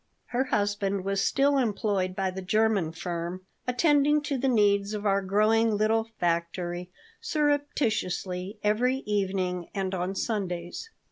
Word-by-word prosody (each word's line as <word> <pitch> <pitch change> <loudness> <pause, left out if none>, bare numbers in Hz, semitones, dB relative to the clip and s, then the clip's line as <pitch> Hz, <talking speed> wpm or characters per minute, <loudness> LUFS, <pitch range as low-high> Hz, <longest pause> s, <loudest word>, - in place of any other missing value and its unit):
Her 255 +2 +2
husband 205 -4 0
was 195 0 0
still 280 0 +3
employed 200 -5 0
by 190 -1 0
the 190 +1 -6
German 205 -3 +1
firm, 175 +2 -5 0.2
attending 295 +3 +3
to 285 -2 -1
the 270 - +1
needs 205 -3 +3
of 210 0 -5
our 200 -1 +3
growing 215 +3 +3
little 220 +1 +2
factory 175 +1 -1 0.3
surreptitiously 230 - -1
every 250 +6 +1
evening 190 -4 -1
and 195 -1 -2
on 185 +1 -2
Sundays. 190 - -3
205 Hz, 130 wpm, -27 LUFS, 185-230 Hz, 0.3 s, still